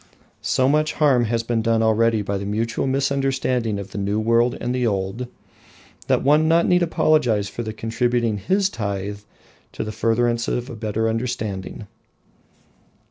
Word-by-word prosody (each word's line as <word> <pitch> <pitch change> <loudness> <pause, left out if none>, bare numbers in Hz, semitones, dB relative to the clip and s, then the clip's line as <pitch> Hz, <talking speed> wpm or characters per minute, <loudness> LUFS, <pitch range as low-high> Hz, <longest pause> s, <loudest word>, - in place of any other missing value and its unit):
So 130 - +1
much 155 +2 +2
harm 135 -6 +3
has 115 +1 -1
been 115 -1 0
done 115 0 +2
already 110 0 +2
by 100 0 -2
the 100 - -5
mutual 115 +5 -1
misunderstanding 135 -4 0
of 100 -1 -7
the 100 - -5
New 100 +2 -1
World 115 +2 +2
and 120 - -2
the 125 -1 0
Old, 100 +4 -2 0.8
that - - +2
one 150 +3 +4
need 165 +1 +3
not 180 0 +4
apologise 140 -11 +2
for 110 - -6
contributing 115 0 -1
his 190 - +1
tithe 100 - -4 0.5
to - - -3
the 110 - -5
furtherance 115 +2 0
of 125 +2 -2
a - - -7
better 110 0 -1
understanding. 110 -4 -3
115 Hz, 155 wpm, -22 LUFS, 110-130 Hz, 0.8 s, one